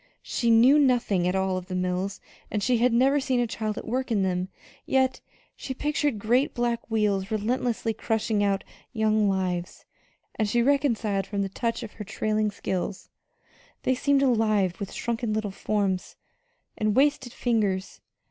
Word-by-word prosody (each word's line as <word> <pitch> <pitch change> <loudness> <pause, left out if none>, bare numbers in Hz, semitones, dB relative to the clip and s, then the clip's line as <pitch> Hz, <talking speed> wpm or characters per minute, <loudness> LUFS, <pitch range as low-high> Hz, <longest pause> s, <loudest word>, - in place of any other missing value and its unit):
She 235 - -1
knew 245 +6 +6
nothing 240 -10 +2
at 180 - 0
all 190 -1 0
of 180 0 -6
the 185 - -4
mills, 185 +2 -2 0.3
and 210 -1 -2
she 245 0 +2
had 245 +1 +3
never 265 +5 +4
seen 260 -2 0
a 240 - +2
child 220 -2 -3
at - - -6
work 255 +2 -2
in 205 -3 +2
them; 185 0 -1 0.3
yet 260 -1 +1 0.3
she 265 - -6
pictured 295 -3 0
great 240 +7 +1
black 240 -1 -1
wheels 205 -3 +1
relentlessly 225 +1 -1
crushing 220 -2 0
out 200 -1 +1 0.3
young 215 -2 +2
lives, 180 -2 -2 0.5
and 215 -1 +1
she 235 +2 +2
recoiled 235 -8 +1
from 200 -1 -1
the 195 - -3
touch 230 +4 -2
of 220 - -7
her 215 - -8
trailing 215 +1 0
silks 190 -1 -4 0.7
they 260 - +2
seemed 275 +2 +2
alive 215 -6 +2
with 200 -2 -5
shrunken 235 -1 -2
little 215 -2 -2
forms 195 -2 -1 0.6
and 215 -1 0
wasted 270 -2 +2
fingers. 210 -7 -1
220 Hz, 165 wpm, -26 LUFS, 195-245 Hz, 0.7 s, knew